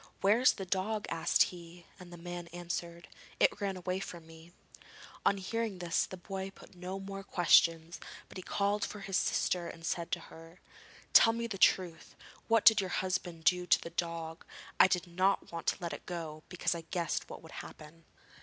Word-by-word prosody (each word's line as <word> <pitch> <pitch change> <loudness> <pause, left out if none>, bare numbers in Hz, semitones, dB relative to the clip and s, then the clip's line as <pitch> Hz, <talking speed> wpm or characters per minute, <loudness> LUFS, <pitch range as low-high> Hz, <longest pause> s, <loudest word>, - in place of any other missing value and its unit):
'Where 205 +4 +4
is 255 - +6
the 195 - -6
dog?' 205 +4 -1
asked 165 -1 +3
he, 170 0 -12
and 180 -1 -12
the 175 - -9
man 175 0 -7
answered: 170 0 -5 0.3
'It - - +3
ran 195 -2 -1
away 185 +1 -2
from 170 -4 -8
me.' 165 +1 -14 0.8
On 200 - +3
hearing 220 +1 -3
this 175 -1 0
the 185 - -8
boy 190 +1 -5
put 195 - -16
no 180 +2 -6
more 195 0 -7
questions, 170 -2 +3 0.3
but - - -15
he - - -5
called 200 +2 0
his 195 -2 -5
sister 175 -2 +1
and 165 0 -10
said 170 0 -2
to 175 - 0
her: 165 +2 -13 0.5
'Tell 225 - +8
me 235 0 -2
the 210 -5 -5
truth. 175 -4 +2 0.3
What 225 -1 +3
did 220 -3 +8
your 190 - -3
husband 180 -3 -2
do 180 +1 +3
to - - +5
the 170 - -8
dog? 165 -1 -4 0.4
I - - +9
did 180 -1 0
not 185 +3 0
want 165 -1 -6
to - - +2
let 170 -1 -3
it - - -9
go, 160 -3 -5
because 180 - 0
I 170 - -5
guessed 170 -2 -2
what - - -9
would - - -12
happen.' 155 +2 -13
180 Hz, 190 wpm, -32 LUFS, 170-195 Hz, 0.8 s, I